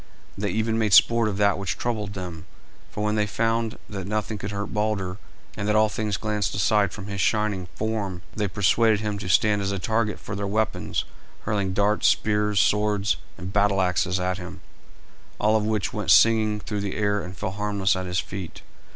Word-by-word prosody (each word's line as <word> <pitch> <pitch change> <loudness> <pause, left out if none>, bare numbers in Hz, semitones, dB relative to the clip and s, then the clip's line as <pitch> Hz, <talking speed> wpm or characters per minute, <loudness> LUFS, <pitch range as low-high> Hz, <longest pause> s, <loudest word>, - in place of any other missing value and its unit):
They 100 +1 -2
even 110 +3 0
made 105 -3 +1
sport 115 +1 +6
of 100 - -3
that 100 -2 +2
which 100 -3 -3
troubled 105 -4 -3
them, 90 -4 -7 0.4
for 105 - -4
when 105 0 +1
they 105 -1 +1
found 115 +2 -1
that 95 -3 -6
nothing 105 0 -2
could 100 - -4
hurt 100 0 -4
Balder, 105 -3 -1 0.4
and 100 - -3
that 105 - +2
all 110 0 +4
things 105 -4 -2
glanced 105 -4 -2
aside 100 +1 +2
from 95 - -8
his 100 -1 -3
shining 105 -4 0
form, 105 -5 -3
they 105 -2 -1
persuaded 105 +3 +2
him 105 -2 -3
to 100 -2 -5
stand 105 +1 +3
as 100 0 -1
a 100 - -2
target 110 +3 -1
for 105 - -6
their 100 0 -3
weapons; 110 0 -1 0.4
hurling 100 -3 -1
darts, 105 +2 +2
spears, 105 -1 +2
swords, 105 -1 +2 0.2
and 95 +2 -7
battle 100 -1 +3
axes 90 0 +1
at 90 +1 -1
him, 90 -1 -9 0.8
all 110 +1 +3
of 105 -1 +1
which 110 -2 -1
went - - -3
singing 110 -2 +5
through 105 0 -4
the 100 -1 -3
air 105 -1 +1
and 90 0 -8
fell 95 - -3
harmless 100 -1 0
at 95 0 -4
his 90 0 0
feet. 95 -3 -6
105 Hz, 195 wpm, -25 LUFS, 95-105 Hz, 0.8 s, sport